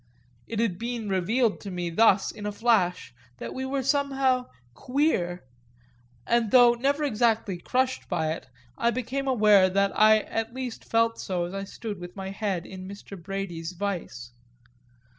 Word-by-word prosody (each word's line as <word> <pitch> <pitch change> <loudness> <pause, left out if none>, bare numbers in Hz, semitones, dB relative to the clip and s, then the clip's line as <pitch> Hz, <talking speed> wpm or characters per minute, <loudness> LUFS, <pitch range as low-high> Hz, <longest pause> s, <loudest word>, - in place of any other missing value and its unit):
It 225 -1 -4
had 205 -6 0
been 235 -2 -4
revealed 210 +5 +1
to 200 - -7
me 175 -2 -3
thus 200 +1 +4
in 205 0 -7
a - - -2
flash 200 - +1 0.2
that - - -6
we 260 0 -4
were 270 0 -1
somehow 270 -2 +1 0.3
queer, 220 - 0 0.8
and 235 -2 +2
though 245 +1 +7
never 280 +5 0
exactly 225 -7 +1
crushed 260 +7 -1
by 160 -4 0
it 160 - -6 0.3
I 235 - +3
became 255 +3 -3
aware 210 -6 +5
that 200 +1 +2
I 215 0 +6
at 225 +2 -4
least 255 -3 -5
felt 230 0 +2
so 180 -2 -2
as 175 - -7
I 195 0 -4
stood 205 0 -7
with 175 0 -9
my 190 -1 -5
head 195 -4 -2
in 185 0 -9
Mr. 200 0 -9
Brady's 185 -2 -5
vise. 170 -11 -4
210 Hz, 160 wpm, -26 LUFS, 185-245 Hz, 0.8 s, though